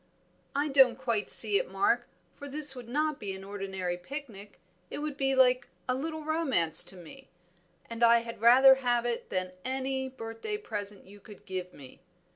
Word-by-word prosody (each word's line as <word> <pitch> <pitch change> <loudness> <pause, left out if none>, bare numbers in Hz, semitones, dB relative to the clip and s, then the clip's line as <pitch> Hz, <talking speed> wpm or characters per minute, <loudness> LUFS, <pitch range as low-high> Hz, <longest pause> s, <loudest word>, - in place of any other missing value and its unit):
"I 290 +2 +1
don't 265 -3 +5
quite 235 -5 -2
see 405 0 +3
it, - - -5
Mark, 400 0 +1 0.3
for 285 -1 -9
this 290 -1 +2
would 245 -2 -10
not 300 +2 -1
be 195 -2 -5
an 190 - -10
ordinary 190 -3 -4
picnic; 210 -1 -9 0.3
it - - -6
would 295 -1 -4
be 270 -1 0
like 255 -1 +3 0.2
a 255 - +1
little 315 +4 -4
romance 285 - +4
to - - -7
me, 185 +10 -13 0.6
and 230 0 -4
I 235 0 +6
had 230 -2 -9
rather 260 +3 +8
have 240 -1 +1
it 240 -1 -3
than 185 -1 -3
any 265 0 -3
birthday 225 - -6
present 205 - -5
you 205 +2 -15
could 205 -1 -15
give 185 -1 -5
me. 135 -3 -14
245 Hz, 180 wpm, -29 LUFS, 205-275 Hz, 0.6 s, rather